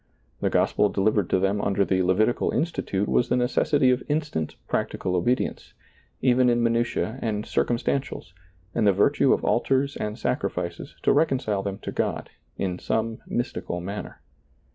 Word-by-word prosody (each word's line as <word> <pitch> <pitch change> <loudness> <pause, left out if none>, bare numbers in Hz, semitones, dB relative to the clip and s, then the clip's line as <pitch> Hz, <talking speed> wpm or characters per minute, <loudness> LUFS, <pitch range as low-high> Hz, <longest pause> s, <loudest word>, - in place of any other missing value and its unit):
The - - +1
gospel 105 - +2
delivered 100 -1 +1
to - - +3
them 95 +2 +1
under 100 0 +1
the 95 -1 +1
Levitical 95 +6 +2
institute 105 - -1
was 120 - +2
the - - +2
necessity 125 +2 +2
of 125 - +1
instant 150 - -2
practical 90 -1 -1
obedience, 120 +8 -1 0.5
even 125 0 +4
in 120 0 +2
minutiae 115 +1 0
and 105 -2 -2
circum 120 - 0
stantials, 135 -8 -3 0.4
and 110 -3 +2
the 100 - +5
virtue 130 +7 +3
of - - +1
altars 135 +3 +1
and 105 0 -4
sacrifices - - -3
to - - +4
reconcile 135 -9 +1
them 100 -1 -4
to - - -4
God - - -2
— - - -41
in 90 -2 -2
some 110 0 -1
mystical 120 -7 -3
manner. 100 +4 -7
110 Hz, 160 wpm, -25 LUFS, 100-125 Hz, 0.5 s, the